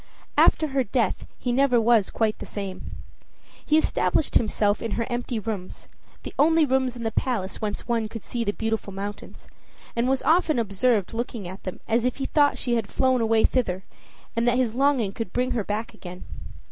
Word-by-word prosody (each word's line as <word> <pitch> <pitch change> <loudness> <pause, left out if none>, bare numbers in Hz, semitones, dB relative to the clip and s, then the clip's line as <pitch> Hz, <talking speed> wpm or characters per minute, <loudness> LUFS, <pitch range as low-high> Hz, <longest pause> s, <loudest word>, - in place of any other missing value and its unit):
After 310 - +4
her 270 -1 +1
death 235 +1 -1
he 245 - -2
never 255 -1 +4
was 225 -3 +4
quite 220 -1 0
the - - -6
same. 195 -2 -6 0.7
He 305 - +3
established 315 -1 +1
himself 210 -2 +2
in 230 - -3
her 230 - -1
empty 240 0 -2
rooms, 210 -4 -5 0.3
the - - -7
only 320 +1 +5
rooms 260 -2 +1
in 235 - -6
the 225 - -1
palace 220 -8 -2
whence 210 0 -3
one 230 -2 0
could 225 0 -8
see 240 -1 -3
the 205 - 0
Beautiful 220 -2 -3
Mountains, 200 +1 -7 0.5
and 235 +2 +1
was 265 0 +1
often 320 -2 +3
observed 215 -1 +1
looking 230 -4 -4
at 185 +2 -8
them 185 - -6
as 230 +1 +2
if 250 0 0
he 270 - -3
thought 290 0 +3
she 245 - -1
had 220 -3 -2
flown 260 -2 +2
away 225 -1 +3
thither, 190 -8 0 0.5
and 230 +1 +1
that 240 +1 +3
his 245 -4 +1
longing 260 -5 +2
could 220 -2 -5
bring 250 +1 0
her 225 - 0
back 215 +4 -3
again. 180 -4 -10
230 Hz, 195 wpm, -25 LUFS, 210-255 Hz, 0.7 s, only